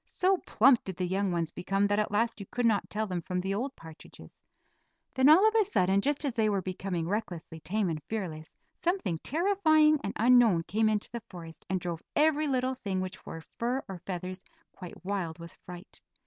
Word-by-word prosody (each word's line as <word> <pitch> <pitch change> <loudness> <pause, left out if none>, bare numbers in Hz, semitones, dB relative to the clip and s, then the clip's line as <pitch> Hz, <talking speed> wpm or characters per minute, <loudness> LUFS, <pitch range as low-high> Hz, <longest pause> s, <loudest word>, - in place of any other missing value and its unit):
So 375 +1 +1
plump 245 +2 +5
did 190 - -6
the 180 - -2
young 190 +1 0
ones 170 -2 -1
become 195 +3 0
that 205 +1 +1
at 210 - 0
last 225 +2 0
you 200 - -8
could 245 -1 -2
not 220 -3 +2
tell 215 +1 -1
them 180 -4 -3
from 180 +2 -3
the 190 +2 -2
old 255 +7 -3
partridges. 160 -1 -14 0.7
Then, 260 +2 +4
all 365 +8 +7
of 440 - +2
a 445 -1 +4
sudden, 195 - +2
just 290 +4 -1
as 275 - -1
they 220 -2 +2
were 200 -2 0
becoming 185 -2 -3
recklessly 175 -5 -4
tame 195 +6 -1
and 160 -3 -3
fearless, 170 -8 -5 0.2
something 340 - -1
terrifying 315 - +3
and 200 - -3
unknown 230 -7 +5
came 215 +6 +1
into 210 -1 -1
the 235 - -5
forest 165 -3 -11
and 190 0 0
drove 170 -2 -4
every 305 0 +3
little 260 -1 0
thing 200 -7 -3
which 185 0 -5
wore 165 - -7
fur 245 +9 -3
or 190 -2 -7
feathers 185 +1 -6 0.3
quite 180 -1 -11
wild 185 -5 -3
with 170 0 -10
fright. 180 +2 -10
200 Hz, 205 wpm, -29 LUFS, 180-250 Hz, 0.7 s, all